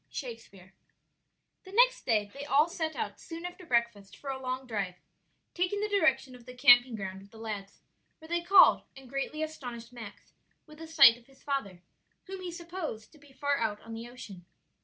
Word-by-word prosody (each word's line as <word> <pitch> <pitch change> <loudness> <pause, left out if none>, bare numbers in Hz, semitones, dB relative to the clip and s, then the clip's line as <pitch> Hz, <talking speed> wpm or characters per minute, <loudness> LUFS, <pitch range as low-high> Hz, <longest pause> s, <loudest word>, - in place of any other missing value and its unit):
Shakespeare. 225 - -9 0.9
The 380 - -13
next - - +4
day 210 -4 +1
they 280 - -7
all 290 +2 +3
set 320 -2 -3
out - - -4
soon 335 +1 -8
after 355 0 -8
breakfast 235 - -1
for 275 - -5
a 265 0 -6
long 255 0 -3
drive, 200 -6 -3 0.6
taking 365 +3 -1
the 420 - 0
direction 295 -10 +2
of 250 -1 -15
the 250 - -10
camping 245 -2 +6
ground 190 -2 -6
of 200 - -16
the 225 - -16
lads, 210 -3 -7 0.4
where 320 - -14
they 345 +1 -1
called 370 +2 +7 0.2
and 270 -1 -13
greatly 275 +4 -3
astonished 245 -6 -7
Max 220 -4 -11 0.3
with 305 0 -15
a 325 - -7
sight 235 -7 +7
of 235 - -22
his 270 -1 -22
father, 200 - -3 0.4
whom 385 0 -8
he 360 -1 -5
supposed 335 - -6
to 310 - -19
be 290 -1 -19
far 285 +1 -1
out 215 -2 -1
on 225 - -10
the 230 +1 -7
ocean. 215 -8 -11
260 Hz, 195 wpm, -30 LUFS, 225-320 Hz, 0.9 s, called